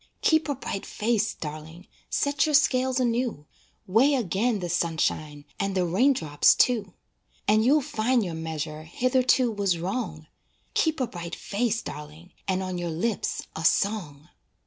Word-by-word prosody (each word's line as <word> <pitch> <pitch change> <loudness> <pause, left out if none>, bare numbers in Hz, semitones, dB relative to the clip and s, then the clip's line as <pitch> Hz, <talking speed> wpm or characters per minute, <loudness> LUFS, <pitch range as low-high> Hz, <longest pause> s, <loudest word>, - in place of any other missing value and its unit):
Keep 315 -1 +3
a 285 - 0
bright 200 -6 -5
face, 220 0 0
darling, 155 +3 -8 0.2
Set 285 +2 +1
your 305 - +2
scales 260 -3 +3
anew, 240 - -1 0.4
Weigh 245 +9 +4
again 225 0 0
the 180 -3 -4
sunshine 155 -3 -1
And 195 -1 -1
the 185 -1 +2
raindrops, 175 - +3
too. 215 -7 +1 0.5
And 215 +1 +4
you'll 290 +6 +4
find 250 -4 +1
your 175 - -4
measure 160 -1 -4
Hitherto 255 - +2
was 200 -4 0
wrong, 175 -3 -4 0.5
Keep 315 -3 +1
a - - +3
bright 175 -5 -7
face, 230 +2 -1
darling, 150 +4 -9 0.2
And 190 0 0
on 185 -1 -3
your 175 -1 -3
lips 190 +7 -2
a 160 - -4
song. 170 -6 0
200 Hz, 145 wpm, -26 LUFS, 165-250 Hz, 0.5 s, Weigh